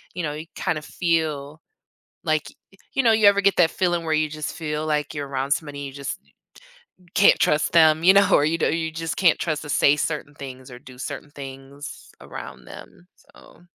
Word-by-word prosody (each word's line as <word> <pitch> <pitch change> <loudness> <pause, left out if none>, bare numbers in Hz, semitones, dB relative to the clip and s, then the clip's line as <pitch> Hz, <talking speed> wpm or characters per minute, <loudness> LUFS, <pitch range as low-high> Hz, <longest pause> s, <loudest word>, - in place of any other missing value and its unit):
you 180 - -3
know 150 -2 -2
you 155 +2 -8
kind 155 - -1
of - - -15
feel 155 -3 -1 0.6
like 155 -1 +1 0.3
y 195 - -22 0.2
you 270 - +2
know, 230 - +5
you 220 -2 +5
ever 200 0 +5
get 200 0 +3
that 165 -2 +4
feeling 175 -2 0
where 160 -1 -1
you 155 0 +2
just 155 0 -5
feel 150 -1 -3
like 150 -1 -1
you're 145 -2 -4
around 135 0 -3
somebody 145 -1 -1
and 140 - -5
you 135 - -10
just 140 -1 -5 1.0
can't 200 - +6
trust 150 +1 +2
them, 160 -1 +5
you 185 +2 +7
know, 200 0 +5
or 145 - +5
you 160 +2 +1
do 160 - +1
you 160 -1 -2
just 165 -1 -4
can't 175 -4 +4
trust 155 -3 -2
to 150 - -9
say 140 +1 +4
certain 150 -1 -3
things, 130 -2 -9
or 125 - -10
do 125 0 -14
certain 145 +2 -7
things 135 +1 -10
around 60 0 -9
them, 175 - -13
so - - -20
155 Hz, 215 wpm, -23 LUFS, 140-165 Hz, 1.0 s, you